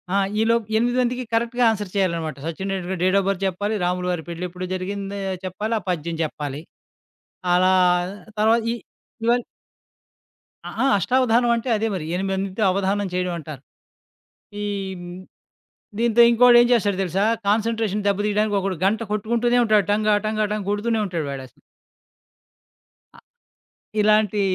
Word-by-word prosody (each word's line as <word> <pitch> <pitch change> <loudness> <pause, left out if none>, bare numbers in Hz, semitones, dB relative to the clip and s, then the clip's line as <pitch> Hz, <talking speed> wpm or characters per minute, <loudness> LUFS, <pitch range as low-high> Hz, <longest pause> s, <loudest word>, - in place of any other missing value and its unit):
ఆ! - - +4 0.2
ఈలోపు 230 0 +2
ఎనిమిది 245 +2 +1
మందికి 250 +1 -1
కరెక్ట్‌గా 235 +2 +1
ఆన్సర్ 205 -3 -4
చేయాలనమాట. 170 -6 -1
Sachin 170 +4 -4
Tendulkar 185 -1 -4
date 185 +1 +3
of 195 - -2
birth 195 -1 -1
చెప్పాలి, 205 +3 -2
రాములువారి 180 -1 -1
పెళ్ళెప్పుడు 180 +2 -5
జరిగిందో 195 +2 -4 0.3
చెప్పాలి, 210 +5 -3
ఆ - - -13
పద్యం 170 -1 -2
చెప్పాలి. 145 -2 -5 0.9
అలా 185 +1 +4 0.7
తర్వాత 220 +2 +4
ఈ - - -1 0.5
ఇవన్ 240 +1 +3 1.3
ఆ! - - -5
ఆ! - - +3
అష్టావధానం 240 +2 +2
అంటే 235 +2 -3
అదే 220 +2 -1
మరి. 165 -4 -4
ఎనిమిది 195 +1 -2
మందితో 195 +2 -2
అవధానం 200 +1 0
చేయడం 180 0 -1
అంటారు. 150 -4 -9 1.0
ఈ - - -2 0.3
హ్మ్, 175 0 -8 0.8
దీంతో 235 0 +4
ఇంకోడేం 240 +1 +7
ఏం - - +1
చేస్తాడో 205 -5 +1
తెలుసా? 190 +3 0 0.2
కాన్సంట్రేషన్ 215 -1 0
దెబ్బ 200 0 +1
తీయడానికొకడు 205 -3 0
గంట 210 +3 +2
కొట్టుకుంటూనే 235 +3 +1
ఉంటాడు. 210 -4 +3
టంగా, 210 0 +2
టంగా, 215 0 0
టంగ 210 -2 -3
కొడుతూనే 220 +2 0
ఉంటాడు 170 -6 -3
వాడసల. 130 -2 -9 1.5
అ - - -18 0.8
ఇలాంటి 210 -1 +3
200 Hz, 135 wpm, -22 LUFS, 180-225 Hz, 1.5 s, ఇంకోడేం